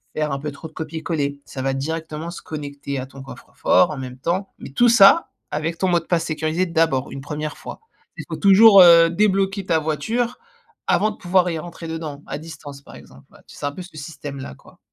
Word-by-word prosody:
faire 155 -1 -1
un 140 - -2
peu 150 +1 -5
trop 145 +3 -10
de 160 - -20
copier-coller. 155 -3 -4
Ça 130 - -7
va 135 0 0
directement 160 +3 -4
se 175 - -9
connecter 140 -2 -6
à 130 - -6
ton 135 0 -12
coffre-fort, 95 -7 +1
en 145 - -6
même 130 -1 -7
temps, 180 +8 -3
mais - - -9
tout 240 - +4
ça 230 +8 +6 0.2
avec 160 +2 -3
ton 190 - +1
mot 175 -1 +3
de 165 - -15
passe 170 -1 0
sécurisé, 155 +3 -1
d'abord, 160 -5 0
une 135 - -7
1re 150 +1 -5
fois. - - -9 0.4
Il - - -7
faut - - -4
toujours, 200 0 +8
heu, 170 -1 +8
débloquer 195 +1 +1
ta 165 -3 +2
voiture, 160 - -2 0.5
avant 215 - +2
de - - -10
pouvoir 180 -2 +2
y 165 - -3
rentrer 165 0 -9
dedans, 155 -3 -6
à - - -4
distance, 145 -3 -10
par - - -15
exemple, 70 +1 -16
ouais. - - -19
Tu - - -14
c'est - - -5
un 145 - -1
peu 185 - -8
ce 175 -2 -15
système-là, 140 - -8
quoi. - - -20
160 Hz, 220 wpm, -21 LUFS, 145-175 Hz, 0.5 s, toujours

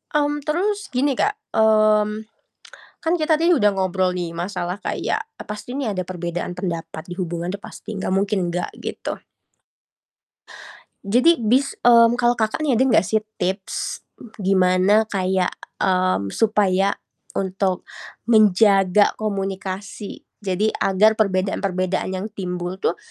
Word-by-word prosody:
Mmm, 295 0 +1
terus 400 +6 -1
gini 265 +3 +1
Kak, 420 +1 +2 0.2
mmm, 215 -1 +4 0.9
kan 330 - 0
kita 315 -1 +2
dih 340 0 +4
udah 210 -4 +4
ngobrol 185 -1 0
nih 175 -2 -4
masalah 180 +1 -3
kayak, 435 - -2 0.2
e - - -3
pasti 210 +3 -6
nih 255 -7 -2
ada 185 - -2
perbedaan 175 0 -4
pendapat 170 -3 -5
di 175 - -5
hubungan 175 -1 -3
tuh 200 +2 -5
pasti, 215 - -8
nggak 190 -1 -2
mungkin 195 -2 0
enggak 175 +1 -2
gitu. - - -5 1.9
Jadi 250 +11 +4
bis 250 +5 +1
mmm, 235 0 +6
kalau 240 0 +3
Kakak 220 +3 -1
nih 285 -4 +2
ada 235 - +3
nggak 220 -5 +4
sih, 220 +3 +1 0.2
tips 190 +2 -3 0.4
gimana 190 +2 +3
kayak, 185 -1 0 0.2
mmm, 185 - +1
supaya 200 -3 +2 0.4
untuk 190 -1 -1 0.4
menjaga 205 -3 +4
komunikasi, 195 -1 -5 0.2
jadi 200 +2 0
agar 200 +3 +3
perbedaan-perbedaan 190 -2 0
yang 190 +1 -3
timbul 180 -1 -5
tuh, - - 0
195 Hz, 130 wpm, -22 LUFS, 185-220 Hz, 1.9 s, mmm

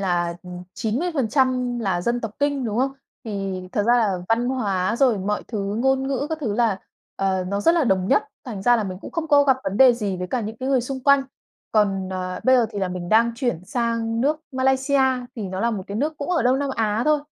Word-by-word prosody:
là 175 -3 0 0.4
90% 255 -1 0
là 190 -6 -1
dân 235 +6 -1
tộc 225 - -4
Kinh, 285 -2 0
đúng 220 +1 -2
không? 270 +1 +1 0.3
Thì 195 -3 -3
thật 205 - +1
ra 240 +1 +5
là 200 -6 +1
văn 235 +2 +2
hóa 205 -5 0
rồi 245 -6 +3
mọi 205 +2 -2
thứ 205 -2 -3
ngôn 265 +1 +2
ngữ 275 +1 -1
các 320 - -3
thứ 215 -7 -1
là, 225 -4 +1 0.4
ờ, 190 -1 0
nó 200 +1 -1
rất 330 - +4
là 325 -5 +2
đồng 190 -3 +1
nhất, 275 - +4 0.2
thành 210 -6 -6
ra 240 +2 +5
là 215 - -1
mình 185 -1 -5
cũng - - -9
không 325 -2 -3
có 290 -1 +6
gặp 265 -2 +4
vấn 195 - -2
đề 260 -2 +7
gì 205 -5 -3
với 180 0 -4
cả 245 +5 -2
những 220 +1 -5
cái 260 +3 -4
người 265 -2 +3
xung 260 +2 -5
quanh. 280 -1 +5 0.5
Còn, 195 -3 +1
ờ, 185 -1 -4
bây 260 0 +6
giờ 240 - +3
thì 205 - -5
là 190 -2 -1
mình 180 -1 -5
đang 230 +2 +4
chuyển 230 -8 -2
sang 230 0 -1
nước 300 +4 +1
Malaysia 265 +1 +2 0.4
thì 220 - -4
nó 190 0 -4
là 235 +2 +1
một 205 -4 -3
cái 200 - -5
nước 305 +5 -1
cũng 285 +5 -4
ở 345 - +2
Đông 255 +2 +3
Nam 280 -1 -1
Á 220 0 0
thôi. 305 -1 +3
230 Hz, 245 wpm, -23 LUFS, 195-265 Hz, 0.5 s, đề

